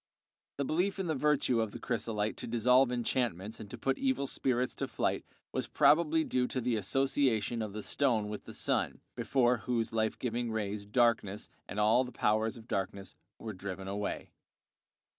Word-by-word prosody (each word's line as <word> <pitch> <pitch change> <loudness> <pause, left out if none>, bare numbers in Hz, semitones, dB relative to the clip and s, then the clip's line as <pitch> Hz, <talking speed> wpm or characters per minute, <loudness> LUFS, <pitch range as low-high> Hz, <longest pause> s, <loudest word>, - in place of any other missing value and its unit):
The 140 - 0
belief 180 +8 0
in 190 - -2
the 160 - 0
virtue 135 -4 +2
of 110 -2 -2
the 120 - -6
chrysolite 110 -3 -1
to - - -6
dissolve 125 +3 +4
enchantments 115 -5 -1
and 105 -2 -8
to - - -7
put 135 - 0
evil 265 - +1
spirits 125 -2 0
to - - -2
flight - - -1 0.3
was - - -2
probably 160 +1 +4
due 125 -4 0
to 130 - -2
the 120 -1 0
association 120 0 +1
of 105 -2 -4
the 105 0 -5
stone 120 -7 +1
with 105 0 -6
the - - -9
sun, - - 0
before 125 -2 +2
whose 115 +1 -1
life 110 -1 0
giving 120 -1 -2
rays 105 -2 -3
darkness 110 -3 +1 0.2
and 100 - -3
all 110 +4 +5
the 125 - -7
powers 110 +1 +1
of 115 0 -13
darkness 95 -1 -3 0.2
were 110 -1 -6
driven 95 0 -6
away. 100 +1 -3
115 Hz, 180 wpm, -32 LUFS, 105-130 Hz, 0.3 s, all